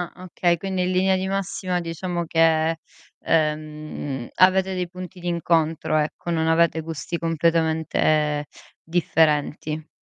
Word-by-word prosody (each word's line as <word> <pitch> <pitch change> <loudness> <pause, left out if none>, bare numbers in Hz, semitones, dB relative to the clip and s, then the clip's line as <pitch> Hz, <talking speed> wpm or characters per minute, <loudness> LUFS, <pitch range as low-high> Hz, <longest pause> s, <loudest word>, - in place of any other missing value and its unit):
ah. 185 - -12
Okay. 175 -1 +1
Quindi 190 +1 -2
in 180 - 0
linea 190 +1 +3
di 190 0 -2
massima 195 -1 -2
diciamo 170 +1 -3
che, 165 0 +2 0.5
ehm, 150 -4 -2
avete 190 +1 +4
dei 180 -1 -2
punti 180 0 -9
d'incontro, 165 -2 0
ecco, 155 +3 -2
non 160 -1 +1
avete 165 0 +3
gusti 160 +1 -5
completamente 160 -2 +1 0.4
differenti. 155 -2 0
165 Hz, 120 wpm, -23 LUFS, 155-180 Hz, 0.5 s, avete